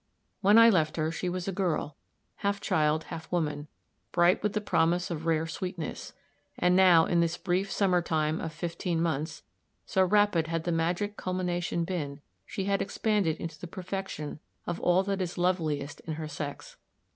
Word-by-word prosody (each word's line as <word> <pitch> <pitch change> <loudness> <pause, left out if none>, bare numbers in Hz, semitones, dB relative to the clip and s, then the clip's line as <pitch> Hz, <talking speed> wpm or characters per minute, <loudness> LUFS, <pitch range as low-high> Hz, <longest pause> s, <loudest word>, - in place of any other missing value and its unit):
When 205 +2 +6
I 230 0 +9
left 160 -5 +1
her 155 0 0
she 180 +2 -2
was 180 +1 -3
a - - 0
girl, 175 -6 -1 0.4
half 200 0 -1
child, 155 -3 +1
half 165 0 -8
woman, 150 -4 -1 0.4
bright 175 +1 +4
with 210 -1 0
the 215 - +1
promise 175 -2 +1
of 165 0 -4
rare 160 -1 +2
sweetness; 165 0 -5 0.4
and 180 0 +3
now, 180 -3 +7
in 175 - +2
this 170 0 +1
brief 190 +1 -1
summer 185 -3 +2
time 155 -2 0
of 165 - -4
fifteen 170 +1 -3
months 160 -1 -2 0.4
so 190 - +2
rapid 195 -4 +3
had 165 0 -2
the 175 - -1
magic 175 +5 -1
culmination 180 -2 -1
been 155 -5 -3 0.3
she 195 - -3
had 200 0 +1
expanded 200 -6 0
into 160 -2 -6
the 175 - -7
perfection 185 -4 -5 0.3
of 170 - -3
all 180 +2 +3
that 195 0 -1
is 180 -1 -3
loveliest 160 -6 0
in 160 - -5
her 155 0 -5
sex. 145 -1 -6
175 Hz, 175 wpm, -29 LUFS, 160-185 Hz, 0.4 s, I